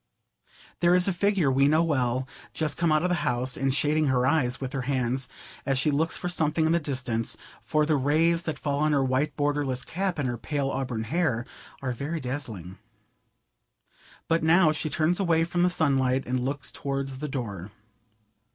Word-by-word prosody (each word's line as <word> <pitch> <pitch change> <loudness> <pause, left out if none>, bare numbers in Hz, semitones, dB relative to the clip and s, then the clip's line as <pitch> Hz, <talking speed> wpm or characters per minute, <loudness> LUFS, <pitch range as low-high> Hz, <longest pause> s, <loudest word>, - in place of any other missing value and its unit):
There 175 +1 +4
is 180 +1 +3
a 195 - +1
figure 185 -5 +2
we 135 +1 +4
know 155 +3 +4
well, 130 -5 0 0.3
just 155 -2 -1
come 170 -2 +1
out 155 +1 +3
of 180 - +1
the - - +2
house, 125 +1 0
and 135 0 0
shading 150 +2 +1
her 125 -2 +2
eyes 130 -3 +1
with 135 0 -5
her 135 - -1
hands 130 -1 0 0.3
as 135 -2 0
she 150 +3 +2
looks 160 +3 0
for 180 - -4
something 160 -2 +1
in 160 - +2
the 170 - +3
distance, 125 -6 -2 0.2
for 155 0 +1
the 155 0 +2
rays 160 +5 +2
that 155 -3 -3
fall 140 0 -2
on 155 0 +2
her 140 -2 +3
white 135 +3 0
borderless 145 -3 -1
cap 190 0 -2
and 145 -3 -1
her 120 -2 -3
pale 140 -1 -2
auburn 125 -4 -3
hair 125 -3 0 0.4
are 130 - -1
very 145 +7 -3
dazzling. 110 - -5 1.5
But 165 0 +2
now 165 0 +5
she 155 +1 -2
turns 165 +4 +1
away 165 -4 +2
from 175 +1 -1
the 180 - +4
sunlight 135 -6 +1
and 125 +1 -1
looks 140 +2 -3
towards 135 -1 -3
the 150 - -3
door. 105 - -5
145 Hz, 190 wpm, -26 LUFS, 130-160 Hz, 1.5 s, now